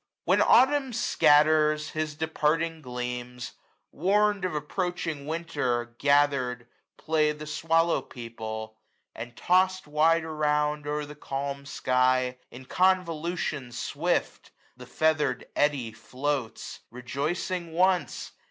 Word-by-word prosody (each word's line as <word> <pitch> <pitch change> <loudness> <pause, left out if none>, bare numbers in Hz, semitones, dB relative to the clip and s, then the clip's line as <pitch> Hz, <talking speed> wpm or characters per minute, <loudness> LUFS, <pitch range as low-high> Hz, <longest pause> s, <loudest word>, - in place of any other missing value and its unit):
When - - +3
Autumn 265 0 +4
scatters 150 -6 +3
his 155 -1 -3
departing 160 +1 0
gleams, 125 -1 -5 0.4
Warn*d 200 +2 +2
of 165 - -5
approaching 160 -1 -3
Winter, 145 -8 -2
gathered, 140 -4 +2 0.3
play 155 -1 +1
835 150 0 -1
The 155 - -6
swallow 165 +2 +1
people; 110 -2 -7 0.4
and 120 +1 -9
toss'd 185 +1 +2
wide 160 +3 +3
around. 150 -1 0
O'er 150 0 -2
the 145 - -10
calm 140 -1 -5
sky, 125 -1 +1
in 130 +2 -11
convolution 170 -6 0
swift. 145 +8 -2 0.3
The - - -12
feather'd 155 -4 +1
eddy 140 -6 +1
floats: 130 +3 -4
rejoicing 155 +8 -3
once. 180 +2 +1
150 Hz, 105 wpm, -27 LUFS, 130-165 Hz, 0.4 s, Autumn